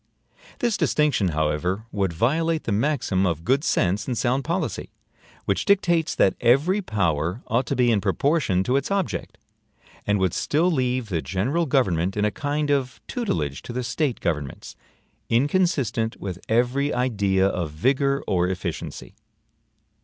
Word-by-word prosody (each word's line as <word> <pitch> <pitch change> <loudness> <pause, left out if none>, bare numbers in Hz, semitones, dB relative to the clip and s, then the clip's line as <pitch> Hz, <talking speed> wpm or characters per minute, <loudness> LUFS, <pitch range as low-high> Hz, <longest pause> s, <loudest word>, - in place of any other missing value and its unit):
This 240 -3 0
distinction, 150 -10 +2
however, 80 +6 -1
would 95 -3 0
violate 155 - +1
the - - -3
maxim 105 -5 +1
of 85 -2 -2
good 135 +4 +2
sense 95 - +1
and 125 -3 -2
sound 130 +3 +1
policy, 170 +6 -2 0.6
which - - 0
dictates 175 -5 +2
that 95 - +4
every 145 - +3
POWER 90 - -1
ought 120 +4 0
to 140 - -1
be 125 -1 +3
in 105 -3 +2
proportion 105 - +1
to 125 +6 +1
its 140 - -2
OBJECT; 195 -3 -2 0.7
and 105 0 +3
would 95 -3 +1
still 165 +5 +1
leave 125 -5 0
the 85 -4 -1
general 135 - -1
government 95 - +1
in 105 - +2
a 105 - +1
kind 145 +4 -1
of 135 -3 -1
tutelage 80 - -2
to - - -8
the 125 +1 -2
State 135 +1 -1
governments, 75 -5 -3 0.5
inconsistent 125 - +1
with 90 -2 -5
every 125 +5 +2
idea 100 -6 +1
of 90 -5 -1
vigor 140 - +1
or 90 -1 +1
efficiency. 95 -1 -5
120 Hz, 150 wpm, -24 LUFS, 95-145 Hz, 0.7 s, that